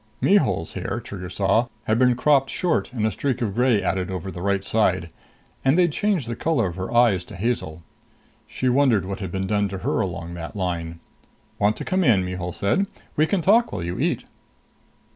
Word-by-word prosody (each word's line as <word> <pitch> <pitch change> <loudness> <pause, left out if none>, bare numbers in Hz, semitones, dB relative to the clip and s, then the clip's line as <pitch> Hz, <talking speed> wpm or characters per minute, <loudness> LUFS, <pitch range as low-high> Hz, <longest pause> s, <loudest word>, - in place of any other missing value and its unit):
Mihul's 95 - +2
hair, - - -3
Trigger 90 -3 -7
saw, 100 +6 +1 0.2
had 110 +2 +1
been 125 -1 +4
cropped 135 +1 +3
short 175 -6 0
and 115 -4 -1
a 110 - +1
streak 130 +4 -2
of 110 -6 -1
gray 120 -3 +2
added 95 0 -1
over 95 0 -4
the 90 - -7
right 100 0 0
side; 85 -6 +1 0.5
and 135 +4 +3
they'd 175 -2 +4
changed 185 - 0
the 115 - -3
color 145 -4 +1
of 90 -2 -3
her 95 +3 -5
eyes 120 -6 +4
to 105 - -11
hazel. 85 -6 -2 0.6
She 130 - -3
wondered 125 -7 +3
what 100 +2 -5
had 95 - -5
been 95 0 -2
done 105 +1 +1
to 95 - -5
her - - +1
along 85 -2 -4
that 85 +3 -7
line. 85 -3 -3 0.6
"Want 105 +1 +2
to - - -6
come 185 0 +1
in?" 105 - +4
Mihul 90 -1 -4
said. 145 - 0 0.3
"We 155 +1 +3
can 190 -2 0
talk 225 +6 +4
while 85 - -4
you 85 +1 -4
eat." - - 0
105 Hz, 200 wpm, -23 LUFS, 90-130 Hz, 0.6 s, been